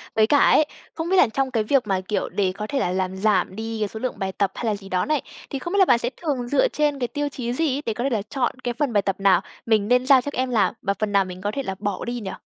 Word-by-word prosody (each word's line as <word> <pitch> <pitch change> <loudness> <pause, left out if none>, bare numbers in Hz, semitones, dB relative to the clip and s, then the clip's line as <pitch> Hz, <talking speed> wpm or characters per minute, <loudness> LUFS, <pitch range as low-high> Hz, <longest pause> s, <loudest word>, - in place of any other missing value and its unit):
Với 220 -1 +4
cả 290 - +4
ấy, 310 - +5 0.3
không 325 +1 -4
biết 380 - +3
là 360 - +6
trong 270 +1 0
cái 225 -3 +1
việc 250 0 +2
mà, 190 -1 0
kiểu, 210 - -1
để 195 -2 0
có 210 +1 -5
thể 275 - -1
là 180 - 0
làm 185 0 -2
giảm 190 -2 +1
đi 225 0 -4
cái 210 - 0
số 220 - -7
lượng 255 -4 -4
bài 190 -1 -2
tập 195 0 0
hay - - -4
là 215 -2 +1
gì 195 -1 -11
đó 180 -1 0
này, 305 -2 +1 0.3
thì 275 - -4
không 345 +7 -5
biết 405 - +2
là 380 - +7
bạn 240 - +5
sẽ 240 - -1
thường 275 -7 -2
dựa 285 - +3
trên 295 - 0
cái 245 - 0
tiêu 290 +3 -2
chí 240 -3 -4
gì 290 0 0
ấy, 285 - -3
để 225 - -1
có 240 - -4
thể 275 - +1
là 225 -5 0
chọn 255 -3 -1
cái 245 - -1
phần 280 -2 -1
bài 205 - +4
tập 195 -1 -1
nào 195 -3 +4 0.2
mình 215 -3 +2
nên 250 +1 +3
giao 270 -2 +6
cho 285 - -4
em 255 0 -1
làm, 205 -6 +2
và 200 - 0
phần 215 -1 -1
nào 200 -1 +3
mình 185 0 -8
có 205 +1 -1
thể 275 - -2
là 190 -5 -4
bỏ 205 -2 -3
đi 240 0 -3
nhỉ? 195 -4 -5
230 Hz, 330 wpm, -23 LUFS, 200-275 Hz, 0.3 s, là